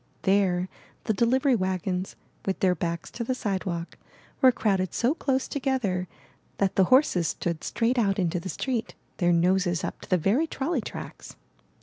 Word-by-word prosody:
There 190 -2 +2 0.4
the 220 - +1
delivery 255 +5 +3
wagons, 185 -1 -2 0.3
with 195 - -2
their 185 -2 +3
backs 170 -2 -3
to 235 - -4
the 255 +2 -1
sidewalk, 185 -7 -3 0.4
were 260 -2 +8
crowded 195 -6 0
so 245 +4 +2
close 265 -5 -1
together 245 -10 -1 0.5
that 195 -2 +1
the 190 - +5
horses 255 - +4
stood 170 0 -3
straight 240 +2 +1
out 195 -4 +2
into 175 -2 0
the 190 - -6
street, 240 - -3 0.2
their 175 -2 +3
noses 175 0 +2
up - - -4
to - - -12
the 185 - +4
very 215 - +2
trolley 280 -1 -1
tracks. - - -8
195 Hz, 160 wpm, -26 LUFS, 180-250 Hz, 0.5 s, were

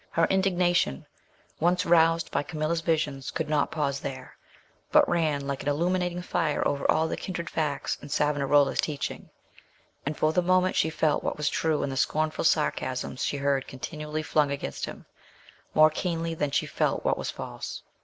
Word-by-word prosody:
Her 165 - +2
indignation, 180 - +2 0.5
once 180 +2 +2
roused 165 -1 +4
by 140 - +1
Camilla's 155 +1 -2
visions, 150 -5 -1
could 160 - -3
not 150 -1 +1
pause 140 -3 -1
there, 130 -2 -7 0.6
but - - +6
ran 155 -5 0
like 140 -1 -3
an 145 - -1
illuminating 180 +3 0
fire 155 -4 0
over 140 -1 -1
all 160 - +3
the - - -2
kindred 170 -3 -5
facts 150 -3 -1
in 145 - -10
Savonarola's 145 -1 +2
teaching, 145 -3 -4 0.7
and 150 +2 -3
for 155 0 +2
the 180 - +3
moment 185 +1 +2
she 160 - +2
felt 155 -1 +1
what - - -2
was 150 -1 +1
true 160 0 0
in 140 - -2
the 135 - -4
scornful 155 +3 0
sarcasms 130 -5 0
she 145 - -1
heard 140 -1 0
continually 150 +3 -5
flung 150 -2 +2
against 140 0 -3
him, - - -9 0.7
more 155 0 +7
keenly 165 0 -2
than 150 -3 -1
she - - 0
felt - - -1
what - - +3
was - - -3
false. - - -6
155 Hz, 175 wpm, -27 LUFS, 140-165 Hz, 0.7 s, more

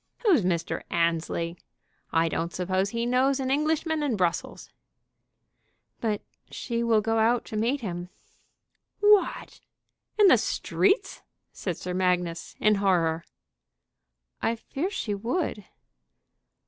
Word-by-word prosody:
Who's 355 - +5
Mr. 170 -3 -1
Annesley? 170 0 -1 0.5
I 165 0 +3
don't 165 +1 -2
suppose 185 +2 -1
he 235 +2 -2
knows 260 +3 +2
an 260 -1 -1
Englishman 310 +2 +1
in 280 -6 0
Brussels." 175 -3 -2 1.3
"But 215 -3 -1 0.3
she 235 -1 -3
will 230 -2 +3
go 225 +1 0
out 230 +2 +2
to - - -7
meet 240 +6 0
him." 175 -4 -5 0.9
"What! 415 -1 +3 0.6
in 420 - +6
the - - +6
streets?" 390 0 0 0.3
said 180 -4 -4
Sir 180 - -5
Magnus, 180 -2 -1
in 215 - +4
horror. 165 -4 +2 1.2
"I 225 +1 +1
fear 285 +9 -4
she 230 - -3
would." 225 - -2
215 Hz, 120 wpm, -27 LUFS, 180-265 Hz, 1.3 s, in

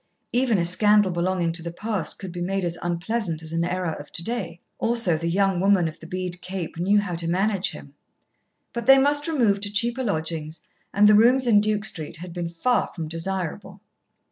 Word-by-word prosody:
Even 245 -3 +2
a 170 - +1
scandal 205 +2 +5
belonging 175 0 0
to 170 +1 -2
the 170 0 -5
past 205 0 -2
could 190 -2 -7
be 175 0 -6
made 190 +1 -1
as 170 -1 -2
unpleasant 175 -1 -2
as 160 0 -7
an 165 0 0
error 180 -1 -2
of 145 - -10
to 170 - -2
day. 175 -6 -4 0.2
Also 230 -7 +2
the 165 +2 -2
young 195 0 +1
woman 190 -2 +3
of 160 - -8
the 165 - -11
bead 180 0 -4
cape 180 -3 -6
knew 200 +4 +3
how 200 -3 -3
to 165 0 -2
manage 195 +2 +1
him. - - -11 0.8
But 235 0 -5
they 270 0 +9
must 290 +2 +2
remove 230 -11 +1
to 205 0 -4
cheaper 235 +5 0
lodgings, 160 -5 -3 0.3
and 205 +1 +5
the 210 - +7
rooms 245 +5 +5
in 215 -4 +5
Duke 215 0 -1
Street 160 -6 -4
had 175 +1 -9
been 170 -1 -4
far 240 +9 0
from 160 -3 -7
desirable. 170 +1 -4
185 Hz, 205 wpm, -24 LUFS, 170-210 Hz, 0.8 s, they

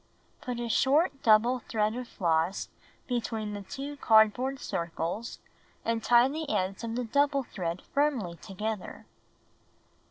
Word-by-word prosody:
Put 245 -1 -4
a 240 - -2
short 275 +4 +2
double 230 +3 +4
thread 215 -1 -1
of 250 0 -5
floss 170 0 0 0.4
between 225 -4 -2
the 205 - -5
2 275 +8 -6
card 220 -4 +6
board 265 +2 -3
circles 170 - -4 0.5
and 230 -1 0
tie 240 +2 +6
the 305 +2 -4
ends 190 -2 -1
of 230 0 -3
the 250 - -1
double 280 +3 +2
thread 180 -6 -4
firmly 275 -12 +1
together. 210 +2 -5
230 Hz, 135 wpm, -29 LUFS, 205-265 Hz, 0.5 s, card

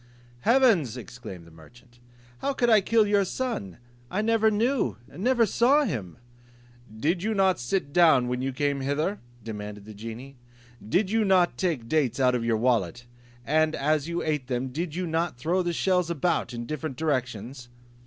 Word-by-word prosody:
"Heavens," 215 - +3
exclaimed 110 -6 -9
the 85 - -16
merchant, 120 +10 -18 0.4
"how 280 - -1
could 240 -3 +2
I 215 -2 +6
kill 220 +2 +3
your 205 -1 +3
son? 190 - -4 0.3
I 210 +8 -1
never 225 0 +3
knew, 235 +5 0
never 240 +4 +1
saw 260 +8 +3
him." 110 - -4 0.8
"Did 170 +7 0
not 195 -4 +2
you - - -13
sit 140 +4 -2
down 160 -8 +5
when 125 0 -2
you 135 +1 -1
came 140 +1 -1
hither?" 150 +9 -1 0.2
demanded 105 -2 -7
the 110 - -10
genie: 115 +6 -9 0.5
"did 185 - 0
you 225 0 +2
not 185 -3 +3
take 160 -11 -2
dates 135 -4 0
out 130 -1 +3
of 120 -2 -1
your 115 -1 +1
wallet, 120 -2 0 0.4
and 155 +2 +2
as 150 +1 0
you 170 0 -2
ate 150 -5 -2
them, 130 0 -2
did 160 +4 -4
not 170 -1 -1
you - - -27
throw 170 +9 0
the 175 -1 -1
shells 180 0 +1
about 170 -1 0
in 120 -1 -5
different 150 -1 -5
directions?" 125 -4 -3
150 Hz, 175 wpm, -26 LUFS, 120-190 Hz, 0.8 s, I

